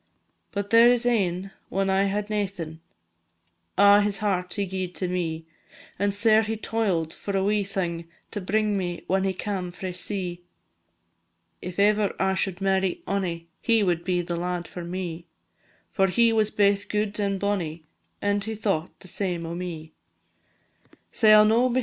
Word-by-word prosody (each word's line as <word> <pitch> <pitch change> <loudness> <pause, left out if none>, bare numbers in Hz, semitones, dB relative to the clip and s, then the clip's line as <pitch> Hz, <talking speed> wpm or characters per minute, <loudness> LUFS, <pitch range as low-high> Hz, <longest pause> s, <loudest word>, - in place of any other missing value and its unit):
But 200 -1 -4
there 230 +1 +8
is 245 -1 +1
ane, 195 -5 0 0.2
when 195 0 0
I 195 +1 +3
had 205 +1 -1
naething, 195 -7 -3 1.0
A' 200 +1 +7
his 205 -1 +1
heart 185 -4 -1
he 200 - 0
gi'ed 185 -1 -4
to 185 - -2
me; 165 -3 -2 0.5
And 205 0 +2
sair 220 +2 +4
he 220 0 -3
toil'd 195 -8 -1
for 200 -1 -3
a 190 - +1
wee 205 +1 +2
thing, 175 -4 -3 0.2
To 205 - -4
bring 210 +2 +1
me 175 -2 -4
when 190 +1 +1
he 190 - 0
cam 190 -2 -3
frae 180 +1 -6
sea. 180 -1 -3 1.2
If 180 0 -7
ever 205 0 +3
I 190 0 +2
should 190 -1 -1
marry 190 -1 0
ony, 175 -4 -2
He 225 -2 +3
will 175 -3 +1
be 180 -1 0
the 175 0 -3
lad 175 0 -3
for 175 - -7
me; 175 -1 -5 0.6
For 195 -1 +2
he 230 +4 +3
was 215 -1 +2
baith 200 -1 +2
gude 210 0 -1
and 200 -1 0
bonny, 175 -6 -2 0.4
And 205 0 +1
he 220 +1 -4
thought 195 -6 -2
the - - -13
same 175 -2 -3
o' 165 - -5
me. 170 -3 -6 1.2
Sae 215 -2 +4
I 215 0 +9
'll - - +5
no, 235 +4 +3
&c. 255 - +2
195 Hz, 175 wpm, -25 LUFS, 180-210 Hz, 1.2 s, I